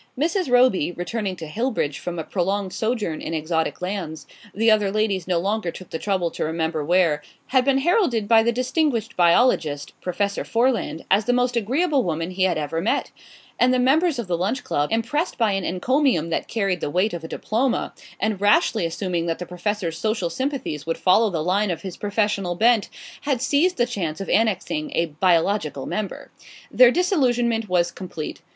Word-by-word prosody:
Mrs. 335 +3 0
Roby, 245 -10 +4
returning 190 +3 -3
to 165 -3 -8
Hillbridge 210 - -2
from 175 -1 -5
a 165 - -3
prolonged 190 +2 -2
sojourn 220 -8 -2
in 165 - -4
exotic 160 +2 -2
lands 180 -5 -4 0.3
the 225 +2 +3
other 210 -2 +3
ladies 200 -4 0
no 180 -2 +1
longer 195 +1 -1
took 185 +1 -10
the 160 - -3
trouble 185 -4 -1
to - - -4
remember 160 -1 -2
where 165 -2 +2 0.3
had 260 -1 +3
been 275 -1 +3
heralded 270 - +1
by 225 0 +6
the 235 +1 +2
distinguished 250 -2 -1
biologist, 170 - +2
Professor 200 +3 -2
Foreland, 230 - 0
as 200 +2 +4
the 245 - +2
most 250 0 +1
agreeable 275 - +1
woman 165 -2 -2
he 185 0 +1
had 175 -3 +1
ever 155 +2 -2
met; 210 - -1 0.5
and 250 - +4
the 255 - +3
members 285 +5 +3
of 235 - -3
the 180 -2 -1
Lunch 220 +9 -1
Club, 145 0 -1
impressed 245 +10 -1
by 225 -3 +2
an 195 -1 -1
encomium 185 - +1
that - - -1
carried 195 -6 -1
the - - -2
weight 185 +7 +1
of 170 -2 -5
a - - -5
diploma, 235 +9 -1 0.3
and 215 -3 -1
rashly 215 - +3
assuming 170 0 -2
that 165 - -1
the 180 - -6
Professor's 180 -1 -3
social 215 -6 -1
sympathies 260 - -3
would 165 +1 -2
follow 210 +4 +4
the 165 -5 -2
line 195 +4 +1
of 175 - -3
his 190 -3 -6
professional 205 -3 -1
bent, 225 +1 +3 0.3
had 275 -4 -1
seized 300 +8 +2
the 240 - +3
chance 180 -10 -4
of 195 - -5
annexing 225 - 0
a 170 - +2 0.2
biological 170 -5 +1
member. 210 -3 -5 0.4
Their 250 -1 +7
disillusionment 245 - +1
was 175 -1 +2
complete. 170 -5 -7
205 Hz, 185 wpm, -23 LUFS, 175-245 Hz, 0.5 s, Their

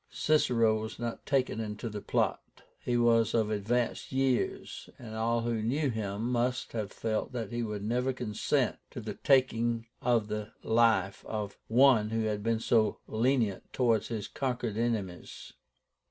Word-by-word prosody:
Cicero 115 -8 +2
was 110 +1 -6
not 120 -1 -5
taken 130 -5 +1
into 110 +1 -4
the 105 -2 -5
plot. - - -2 0.2
He 120 -1 0
was 115 -1 +3
of 110 -2 +2
advanced 115 +4 -1
years, 130 -2 -1
and 110 -3 -9
all 115 +1 0
who 115 -1 -1
knew 135 +5 0
him 105 -1 -3
must 125 +1 0
have 110 -4 -3
felt 110 +3 -2
that 115 -4 -4
he 120 0 -2
would 105 -3 -3
never 125 +4 0
consent 120 -5 0
to - - -7
the - - -5
taking 120 -4 +2 0.2
the 105 -2 0
life 110 -4 +2
of 105 -2 -4
one 120 -3 +5
who 115 0 0
had 105 -1 -1
been 115 +1 0
so 110 -1 +2
lenient 115 -3 0
towards 115 -4 +2
his 110 -3 -4
conquered 125 -5 -2
enemies. 110 -6 -3
115 Hz, 155 wpm, -30 LUFS, 110-120 Hz, 0.2 s, one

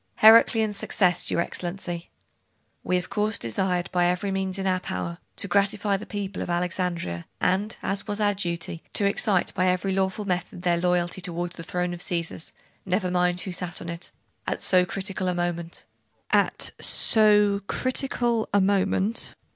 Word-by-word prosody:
'Heraclian's 220 -1 +6
success, 180 -3 +2
your - - +1
Excellency.' 175 -1 -4 0.7
'We 180 - +1
of 180 - -5
course 210 0 +1
desired, 175 - 0
by 180 -1 +2
every 180 +3 -1
means 190 0 -2
in 195 - -3
our 185 -1 +1
power, 170 -1 -5 0.2
to - - -1
gratify 200 +1 +1
the 195 - -6
people 200 -2 -4
of - - -4
Alexandria, 175 - -2
and, 195 +4 0
as 195 +2 -1
was 205 0 -2
our 205 -1 +2
duty, 170 -3 -3
to 205 - +2
excite 200 -1 +1
by 185 - +1
every 185 +1 +1
lawful 190 +2 -1
method 180 -1 -3
their 175 -2 +2
loyalty 180 0 0
toward 175 -1 -2
the 170 - -9
throne 180 +1 -2
of 175 - -7
the - - +2
Caesars 170 -2 -2 0.3
(never 185 0 -1
mind 180 0 +1
who 190 - -4
sat 175 0 -3
on 170 - -7
it) 170 +1 -7 0.4
at - - -2
so 180 -1 +5
critical 190 -1 -3
a 180 - 0
moment.' 175 -1 -3 0.9
'So 210 -2 +4
critical 245 -3 -1
a 205 - +4
moment.... 200 +2 +1
185 Hz, 165 wpm, -25 LUFS, 175-200 Hz, 0.9 s, Heraclian's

